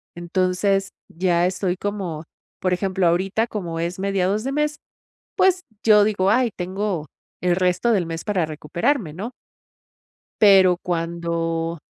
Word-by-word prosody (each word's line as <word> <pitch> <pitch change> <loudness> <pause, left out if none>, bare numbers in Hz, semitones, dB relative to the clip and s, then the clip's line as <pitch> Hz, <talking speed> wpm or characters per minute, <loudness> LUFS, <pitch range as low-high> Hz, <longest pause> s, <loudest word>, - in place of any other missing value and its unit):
entonces 185 +3 0 0.2
ya 175 0 +1
estoy 185 -1 -1
como, 190 -7 -4 0.4
por 185 0 0
ejemplo, 185 -1 0
ahorita 190 +6 +1
como 175 -7 -4
es 170 +2 -2
mediados 195 +2 0
de 270 - -2
mes, 300 +1 0 0.6
pues 370 -1 +4 0.2
yo 210 -2 +6
digo: 200 -2 +2
"Ay, 250 0 +3
tengo 185 -2 -3 0.4
el 180 -1 +2
resto 185 +5 +1
del 190 -6 +2
mes 165 0 -5
para 190 -6 0
recuperarme", 170 - -1
¿no? 220 +8 -6 1.1
Pero 190 -4 +6
cuando 165 -1 -2
185 Hz, 130 wpm, -22 LUFS, 170-205 Hz, 1.1 s, yo